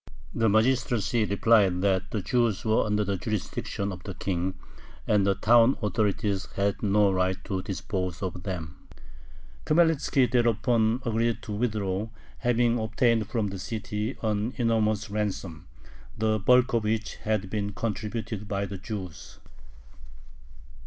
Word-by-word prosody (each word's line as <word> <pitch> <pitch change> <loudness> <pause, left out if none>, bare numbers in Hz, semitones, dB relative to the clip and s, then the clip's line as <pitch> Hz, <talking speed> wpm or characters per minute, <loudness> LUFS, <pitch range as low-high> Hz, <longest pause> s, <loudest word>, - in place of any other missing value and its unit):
The 115 -1 +2
magistracy 115 0 +2
replied 100 -3 +3
that 95 -1 +1
the 105 -4 -3
Jews 120 -5 +1
were 110 0 +2
under 105 0 +1
the 100 -1 -1
jurisdiction 100 0 -3
of 90 -1 -8
the 95 +1 -7
king, 95 0 -2 0.5
and 105 -2 +2
the 100 - +3
town 120 +5 +5
authorities 105 -1 0
had 100 0 0
no 105 -1 +3
right 95 0 +1
to 95 -1 -2
dispose 95 -1 -4
of 90 -1 -4
them. 85 -5 -6 0.8
Khmelnitzki 150 -6 +3
thereupon 115 0 +2
agreed 115 0 0
to - - -7
withdraw, 105 -2 -1 0.3
having 120 -1 +2
obtained 110 0 +1
from 110 -4 -1
the 95 0 -6
city 105 +3 -4
an 110 +2 -1
enormous 110 -3 +1
ransom, 95 -5 -3 0.5
the 110 0 +1
bulk 125 +5 +4
of 115 -2 +2
which 110 +1 -2
had 105 -3 -2
been 105 -1 -2
contributed 110 0 -4
by 100 0 -1
the 100 0 -7
Jews. 95 -8 -7
105 Hz, 135 wpm, -27 LUFS, 100-115 Hz, 0.8 s, town